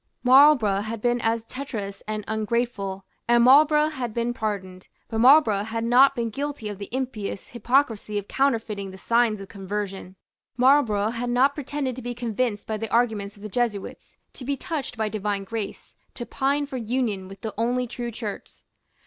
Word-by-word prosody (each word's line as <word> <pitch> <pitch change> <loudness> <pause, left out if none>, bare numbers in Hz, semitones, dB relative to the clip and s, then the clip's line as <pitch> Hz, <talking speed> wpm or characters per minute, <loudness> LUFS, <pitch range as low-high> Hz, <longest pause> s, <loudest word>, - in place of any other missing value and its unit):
Marlborough 255 -6 +6
had 220 +1 -5
been 240 +2 +1
as 225 0 0
treacherous 225 -7 -6
and 215 0 -3
ungrateful; 220 -3 -2 0.2
and 240 0 +5
Marlborough 300 +4 +6
had 250 -7 -5
been 235 +1 0
pardoned. 195 -6 -4 0.2
But 225 - -2
Marlborough 245 -5 +6
had 225 +1 -3
not 260 +4 +5
been 230 -2 -2
guilty 280 -3 -4
of 205 -2 -7
the 200 - -7
impious 245 -6 -4
hypocrisy 235 -3 0
of 205 -1 -4
counterfeiting 225 -7 0
the 190 - -10
signs 230 0 +2
of 195 - -8
conversion. 195 -1 -5 0.4
Marlborough 240 -5 +3
had 240 +1 -3
not 260 +4 +3
pretended 280 -2 -3
to - - -6
be 245 0 -5
convinced 235 -2 -2
by 220 - -3
the 225 0 -5
arguments 215 -3 0
of 205 - -15
the - - -4
Jesuits, 215 -2 -3 0.2
to - - -9
be 280 +2 -2
touched 300 -6 -4
by 220 -1 0
divine 205 -1 -2
grace, 220 -1 -6 0.2
to 240 - -5
pine 280 +3 0
for 275 -2 -6
union 225 -5 -2
with 195 0 -12
the 220 - -5
only 245 +3 0
true 240 0 -5
Church. 215 -3 -6
230 Hz, 175 wpm, -25 LUFS, 210-255 Hz, 0.4 s, Marlborough